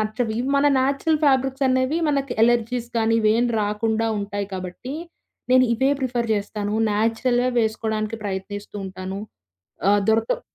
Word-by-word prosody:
నచ్చవు. 220 +2 -1
ఇవి 260 +3 -2
మన 285 +1 +3
న్యాచురల్ 280 +4 +1
ఫ్యాబ్రిక్స్ 270 0 +2
అనేవి 260 +5 +1
మనకి 275 -3 0
అలెర్జీస్ 240 0 +1
కానీ, 225 0 +2
ఇవేమీ 230 +3 +3
రాకుండా 220 +2 0
ఉంటాయి 200 0 -3
కాబట్టి, 185 +9 -6 0.6
నేను 255 0 +6
ఇవే 265 +4 +2
ప్రిఫర్ 240 -3 -1
చేస్తాను. 205 0 -3 0.2
న్యాచురల్‌గా 235 +4 +1
వేసుకోవడానికి 220 -1 -1
ప్రయత్నిస్తూ 205 +1 -5
ఉంటాను. 190 +1 -6 0.7
ఆహ్, 205 0 +4
దొరక 225 +1 +2
225 Hz, 130 wpm, -23 LUFS, 210-255 Hz, 0.7 s, నేను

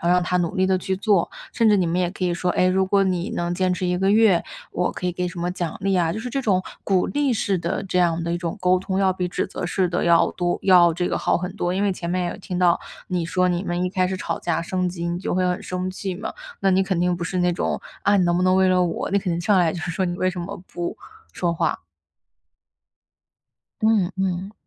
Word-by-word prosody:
后 - - +2
让 180 0 +4
他 180 0 0
努 175 +2 -1
力 185 0 +3
地 190 -1 +2
去 190 +1 -2
做。 200 -3 +2 0.2
甚 230 -2 +3
至 210 - +5
你 185 - +2
们 175 +2 0
也 175 -1 0
可 185 - -4
以 175 - +1
说， 180 +1 -1
哎， 185 - +2
如 190 +1 +2
果 195 0 +3
你 180 -2 -1
能 175 0 -1
坚 185 0 +1
持 180 +1 -4
1 180 0 0
个 195 +1 +2
月， 210 -5 +5 0.3
我 - - 0
可 180 - -5
以 180 - 0
给 180 0 -2
什 175 - -9
么 175 +1 -1
奖 175 -3 -4
励 195 0 +1
啊。 170 -3 +2
就 210 - -3
是 245 +2 -5
这 275 +2 -1
种 190 -6 +1 0.2
鼓 190 -2 +2
励 285 -3 0
式 195 -3 0
的 170 +3 -2
这 180 -1 -1
样 170 -1 +2
的 170 - -1
一 175 - -1
种 170 +3 -4
沟 185 0 +4
通， 190 0 -2
要 190 -1 +3
比 180 -1 -2
指 - - -2
责 - - -5
式 180 0 0
的 175 - 0
要 170 -1 +4
多 175 -1 -1
要 175 -3 +6
这 175 +1 -1
个 - - -1
好 - - +1
很 180 +1 -5
多。 180 -3 -1
因 195 - 0
为 200 -2 +2
前 170 -1 -6
面 180 0 -1
有 - - -7
听 180 -2 -5
到 175 -1 +3 0.3
你 175 -3 -1
说， 185 +1 +1
你 175 0 0
们 175 -1 -2
一 180 - -1
开 185 -1 +1
始 190 - -2
吵 - - -3
架 165 -1 -1
升 180 +1 -1
级， 170 -1 -4
你 175 0 -2
就 185 - -2
会 185 0 +2
很 180 0 -1
生 185 0 -3
气 190 0 -4
嘛。 200 +5 -5 0.3
那 195 - +3
你 190 +1 +3
肯 190 -2 -1
定 180 +1 +2
不 175 - -6
是 185 - -3
那 180 0 +2
种 170 - -1 0.2
“啊， 205 - +4
你 185 - +3
能 175 0 +2
不 180 - +1
能 185 0 +4
为 190 0 +4
了 185 0 +3
我？”， 170 - -2
你 200 - +3
肯 185 -3 -2
定 170 - -2
上 190 +3 +3
来 170 -3 +3
就 - - -5
是 175 - -3
说 185 +2 -1
“你 175 - -3
为 185 0 +1
什 180 - -6
么 185 +4 -5 0.2
不 175 0 -4 0.4
说 175 -2 -1
话？” 165 - 0 2.0
嗯 215 -5 +3
嗯。 190 +1 -2
180 Hz, 295 characters per minute, -23 LUFS, 175-190 Hz, 2.0 s, 要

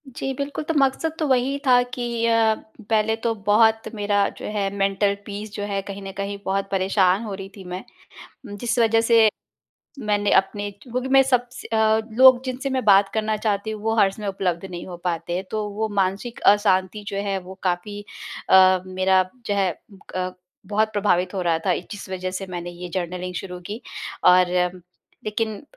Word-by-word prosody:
जी 270 - -3
बिल्कुल, 280 +3 -4
तो 325 - -2
मक़सद 280 +3 +1
तो 310 - 0
वही 265 +1 +2
था 245 -1 +6
कि 235 -2 -2
अ, 225 -1 +3 0.3
पहले 220 0 +2
तो 225 0 -1
बहुत 220 +1 +4
मेरा 205 -1 +1
जो - - -8
है 200 -2 -1
मेंटल 200 0 +1
पीस 205 +1 -6
जो 205 - -4
है 200 -1 -2
कहीं 200 0 -8
न 195 - -6
कहीं 200 0 -3
बहुत 195 +1 -1
परेशान 190 +1 +2
हो 210 -3 -5
रही 195 0 -7
थी 195 - -10
मैं, 180 +1 -6 0.7
जिस 235 +4 -2
वजह 225 0 +4
से 225 -1 +5 0.7
मैंने 205 -4 0
अपने 205 +1 0
क्योंकि 245 +5 -5
मैं 270 0 +6
सबस 250 -2 -1
अ, 220 0 +3
लोग 255 +1 +7
जिनसे 260 +1 -3
मैं 260 -1 -1
बात 200 -1 +6
करना 215 0 0
चाहती 210 0 -1
हूँ 215 -1 -6
वो 225 0 0
हर 195 -2 +5
समय 210 +1 -7
उपलब्ध 185 -3 -2
नहीं 175 -1 -7
हो 180 -2 -7
पाते 175 -1 -2
हैं, 185 - -3
तो 215 -1 -2
वो 215 +2 -2
मानसिक 195 +6 -2
अशांति 205 0 0
जो 200 - -4
है 195 -1 0
वो 185 +1 -10
काफ़ी 185 +3 -2 0.5
अ, 185 -1 +6
मेरा 185 0 +3 0.2
जो 205 - 0
है 195 -2 +2
उ 195 +5 -19
ब - - -19 0.2
क 185 0 -2 0.3
बहुत 215 +1 +1
प्रभावित 190 -3 +1
हो 190 - -1
रहा 170 -2 +1
था 185 - +3 0.2
जिस 205 -1 -8
वजह 185 0 -3
से 195 - -5
मैंने 175 -1 -5
ये 175 +1 -8
जर्नलिंग 180 0 -3
शुरू 180 -1 -5
की 215 +3 -6 0.5
और 180 0 +7 0.8
लेकिन 215 +1 -2
205 Hz, 190 wpm, -23 LUFS, 190-225 Hz, 0.8 s, लोग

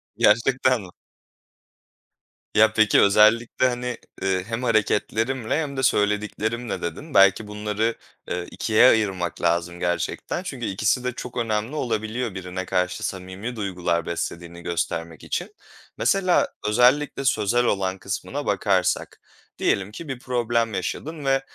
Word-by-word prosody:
Gerçekten 125 +3 +3
mi? 95 - -10 1.7
Ya, 110 0 +5
peki, 110 -2 +5
özellikle, 110 +5 +4
hani, 125 0 -3 0.2
eee, 95 -1 0
"hem 115 +2 -3
hareketlerimle 110 +2 +1
hem 140 -3 -5
de 130 - -1
söylediklerimle" 105 +1 0
dedin. 135 - -6
Belki 100 +2 +5
bunları, 105 +2 -1 0.3
eee, 90 0 -2
2'ye 110 +2 +4
ayırmak 95 -7 0
lazım 85 +1 0
gerçekten 90 - -2
çünkü 135 -10 -5
ikisi 110 +6 0
de 125 - -1
çok 125 0 -8
önemli 115 +3 -1
olabiliyor 115 -3 -2
birine 95 0 -5
karşı 90 +1 -1
samimi 95 +6 -6
duygular 90 -5 -1
beslediğini 85 0 -5
göstermek 85 -2 -3
için. - - -4 0.4
Mesela 185 +7 +3 0.2
özellikle 125 +5 +3
sözel 120 +1 +2
olan 95 -3 0
kısmına - - -4
bakarsak, - - 0 0.4
diyelim 100 +1 0
ki 155 +9 -9
bir 135 -3 -5
problem 120 -2 0
yaşadın 145 - -4
ve, 135 0 +3
110 Hz, 125 wpm, -24 LUFS, 95-125 Hz, 1.7 s, Ya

